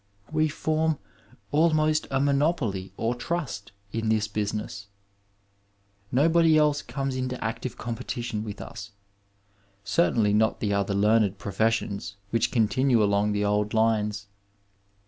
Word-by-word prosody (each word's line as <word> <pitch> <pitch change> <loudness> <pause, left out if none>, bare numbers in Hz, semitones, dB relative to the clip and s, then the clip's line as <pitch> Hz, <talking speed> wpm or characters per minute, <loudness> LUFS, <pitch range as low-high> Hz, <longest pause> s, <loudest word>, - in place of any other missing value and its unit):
We 155 0 +2
form 155 +1 0 0.5
almost 155 0 +2
a 135 - 0
monopoly 140 - 0
or 115 +2 0
trust 125 - -4 0.2
in 115 -1 -2
this 110 -1 +2
busi 105 0 -2
ness. 100 -2 -6 1.2
Nobody 160 +4 +4
else 150 -1 +3
comes 135 +1 -3
into 130 -1 -3
active 115 +2 -4
competition 120 -2 -4
with 105 -2 -7
us, 100 +1 -9 0.9
certainly 110 -8 +2
not 110 +1 +2
the 105 -2 0
other 100 0 0
learned 105 -1 +3
professions 100 -1 -1 0.2
which 115 -2 +1
con 115 -3 +3
tinue 130 +3 +2
along 105 0 +2
the 105 0 0
old 105 +1 0
lines. 105 -2 +1
115 Hz, 125 wpm, -26 LUFS, 105-140 Hz, 1.2 s, Nobody